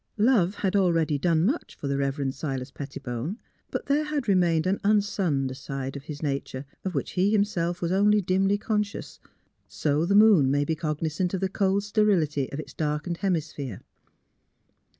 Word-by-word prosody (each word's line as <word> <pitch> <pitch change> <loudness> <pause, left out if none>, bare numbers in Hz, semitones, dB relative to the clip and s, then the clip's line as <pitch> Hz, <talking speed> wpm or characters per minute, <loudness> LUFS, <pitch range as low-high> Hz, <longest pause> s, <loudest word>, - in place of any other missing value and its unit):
Love 210 -4 +3
had 195 -1 -1
already 165 -6 +2
done 165 +1 +2
much 275 - -1
for 140 - -6
the 140 - 0
Rever 140 +1 -1
end 135 -1 -1
Silas 135 -3 -4
Pettibone; 135 - -5 0.3
but - - -4
there 290 +2 +1
had 300 -4 -2
remained 175 -4 +3
an 190 +2 +1
unsunned 195 -10 +1
side 135 0 -5
of 140 0 -8
his 150 0 -7
nature 140 -1 -3 0.2
of 185 -3 -3
which 140 - -2
he 190 +2 +2
himself 185 -5 0
was 170 - 0
only 205 +2 +4
dimly 195 +1 +2
conscious, 210 -1 -3 0.5
so 150 +1 0
the 195 +4 +2
moon 205 -10 +6
may 145 +1 +2
be 160 - 0
cog 155 -2 -3
nisant 170 +4 -1
of - - -2
the 190 - 0
cold 195 +1 +1
sterility 190 -10 +1
of 140 - -5
its 155 - -8
darkened 155 +3 -2
hemi 180 -4 +1
sphere. 140 - -7
170 Hz, 180 wpm, -26 LUFS, 145-200 Hz, 0.5 s, moon